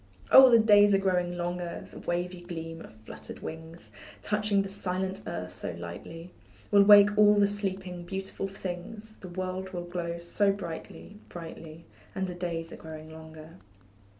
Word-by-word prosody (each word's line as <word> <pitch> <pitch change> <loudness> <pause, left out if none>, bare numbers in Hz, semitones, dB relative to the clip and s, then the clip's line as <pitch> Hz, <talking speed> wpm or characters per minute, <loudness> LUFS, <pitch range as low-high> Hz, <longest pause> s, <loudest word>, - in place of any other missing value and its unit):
Oh, 265 -1 +10
the 235 - +7
days 205 -2 +6
are - - +5
growing 180 -2 0
longer, 175 0 -4
The - - -10
wavy 175 +1 -3
gleam 165 -2 -7
of - - -13
fluttering - - -10
wings, 160 -7 -9 0.3
Touching 210 -1 +1
the - - -5
silent 190 0 -3
earth 90 +1 -5
so 85 - -6
lightly, 160 - -9 0.4
Will 200 -1 +7
wake 205 0 +8
all 210 0 +7
the 205 0 +5
sleeping, 190 -3 -3
beautiful 195 +1 -4
things, 195 +3 -7
The 185 - -10
world 185 +1 -4
will 175 -1 -4
glow 175 -1 -4
so 195 +4 +1
brightly 195 +2 -8
brightly; 165 -1 -10 0.3
And 190 -1 -1
the 180 - -5
days 170 -2 -4
are - - -9
growing 155 0 -10
longer. 160 +1 -12
180 Hz, 160 wpm, -28 LUFS, 165-195 Hz, 0.4 s, Oh